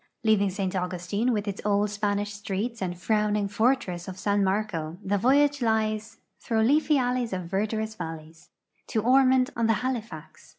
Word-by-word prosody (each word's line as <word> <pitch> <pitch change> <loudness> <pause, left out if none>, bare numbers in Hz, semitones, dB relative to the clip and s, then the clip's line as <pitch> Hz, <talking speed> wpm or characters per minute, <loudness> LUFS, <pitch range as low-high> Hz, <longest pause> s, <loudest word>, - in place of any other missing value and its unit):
Leaving 210 -3 +3
St. 190 0 -3
Augustine, 180 +6 -1
with 210 -2 -1
its 200 -1 -4
old 205 0 +2
Spanish 205 0 -1
streets 205 +3 -4
and 180 -2 -3
frowning 210 0 +1
fortress 205 -5 0
of 190 -1 -7
San 205 +1 +1
IMarco, 190 -5 -1
the 200 +1 +1
voy 265 +7 +5
age 285 -1 -1
lies 220 -1 0 0.2
"Thro' 220 -1 0
leafey 300 +4 +3
alleys 245 -3 0
of 185 -1 -3
verdurous 215 +4 -2
valleys" 160 -3 -8 0.4
to 220 - -1
Ormond 260 +1 +4
on 230 -1 +1
the 225 - +4
Halifax. 240 -4 -5
210 Hz, 165 wpm, -26 LUFS, 190-230 Hz, 0.4 s, voy